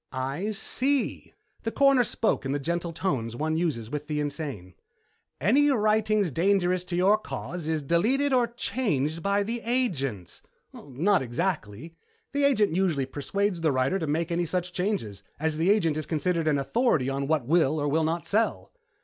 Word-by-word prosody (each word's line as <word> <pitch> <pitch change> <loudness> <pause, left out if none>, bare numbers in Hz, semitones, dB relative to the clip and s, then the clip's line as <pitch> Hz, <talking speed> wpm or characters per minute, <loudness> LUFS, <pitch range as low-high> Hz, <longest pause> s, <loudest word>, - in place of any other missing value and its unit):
"I 135 +10 -3
see." 260 +6 -2 0.3
The 225 - -3
Coroner 275 -1 +4
spoke 225 0 0
in 135 0 -2
the - - +1
gentle 170 +4 -2
tones 130 -10 -2
one 155 +4 -1
uses 145 -10 -2
with 150 0 -4
the 150 -1 -2
insane. 140 - -4 0.7
"Any 260 - +4
writing 215 -3 +2
dangerous 180 +2 +1
to 180 - -4
your 195 +4 +4
cause 175 -6 -6
is 160 -2 -1
deleted 245 - +2
or 245 -2 +3
changed 175 - -1
by 200 +3 +1
the 230 +3 -4
agents." 145 - -2 0.3
"Not 165 +9 0
exactly. 130 - -3 0.4
The 285 0 +2
agent 215 - +2
usually 170 -8 +1
persuades 180 +7 -2
the 160 -2 +2
writer 130 +8 +1
to 160 - -3
make 165 +3 -1
any 170 0 0
such 180 +1 -2
changes, 180 - -2 0.2
as 155 0 -1
the 165 +4 +2
agent 170 -7 +3
is 155 - -4
considered 165 0 0
an 150 -2 +3
authority 155 - +1
on 135 0 -2
what 150 -5 +1
will 155 0 +2
or 145 - 0
will 160 +3 +1
not 165 +2 -1
sell." 220 +2 0
170 Hz, 170 wpm, -27 LUFS, 145-205 Hz, 0.7 s, Coroner